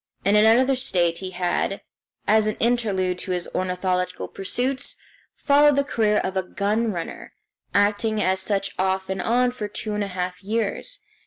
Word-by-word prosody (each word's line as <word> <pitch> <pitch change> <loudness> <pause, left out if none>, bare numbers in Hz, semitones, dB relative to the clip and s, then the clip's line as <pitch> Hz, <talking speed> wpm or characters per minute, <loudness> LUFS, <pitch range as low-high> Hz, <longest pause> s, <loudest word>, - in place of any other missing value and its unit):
In 200 +1 +4
another 230 +5 +5
state 175 -10 0
he 190 - -5
had, 180 +2 -1 0.4
as 215 0 +4
an 215 - -1
interlude 200 -7 0
to 190 - -6
his 180 -1 -2
ornithological 180 0 -1
pursuits, 250 +7 -1 0.4
followed 290 0 +4
the 280 - +3
career 220 -6 +1
of 190 -2 -1
a 190 - +2
gun 210 +4 -1
runner, 170 -4 -6 0.4
acting 210 +2 +2
as 190 -2 +1
such 195 0 -1
off 190 0 0
and 190 -1 -2
on 245 +4 +2
for 220 -4 -5
two 210 +1 -4
and 210 0 -1
a - - -3
half 180 0 -4
years. 220 - -2
205 Hz, 165 wpm, -24 LUFS, 185-230 Hz, 0.4 s, another